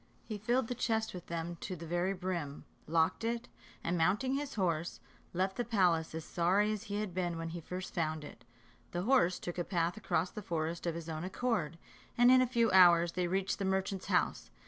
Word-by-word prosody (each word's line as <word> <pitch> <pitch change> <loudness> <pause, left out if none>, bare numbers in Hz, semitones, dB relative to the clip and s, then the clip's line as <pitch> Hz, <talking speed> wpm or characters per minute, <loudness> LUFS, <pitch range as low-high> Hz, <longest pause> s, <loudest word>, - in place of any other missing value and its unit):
He 215 -2 -6
filled 240 +3 +1
the 245 - -2
chest 225 -2 -1
with 180 -2 -8
them 170 0 -4
to 185 - -5
the 165 0 -8
very 175 +3 0
brim, 180 -6 -4 0.2
locked 165 +5 +2
it, 235 +1 -2 0.4
and 170 - 0
mounting 210 +11 +2
his 285 +1 -3
horse, 170 -5 -1 0.3
left 190 +2 -1
the 240 - +1
palace 180 -9 +2
as 160 -1 -5
sorry 190 +5 +2
as 215 +1 -5
he 205 -1 -2
had 205 -4 -4
been 175 -1 -1
glad - - -5
when 165 0 -4
he 170 +1 -6
first 180 +3 -6
found 155 -3 -1
it. - - -11 0.5
The 175 +1 -1
horse 215 -7 +3
took 175 0 -5
a - - +1
path 175 +1 -1
across 180 -4 0
the 215 - -6
forest 170 -2 -3
of 165 - -1
his 165 -1 -6
own 160 0 -4
accord, 185 -5 -1 0.4
and 245 +1 +7
in 255 0 +7
a 255 - +3
few 235 -2 +2
hours 175 -2 +7
they 180 0 -1
reached 190 +2 -1
the 200 - -1
merchant's 190 0 -1
house. - - +1
180 Hz, 215 wpm, -33 LUFS, 170-210 Hz, 0.5 s, and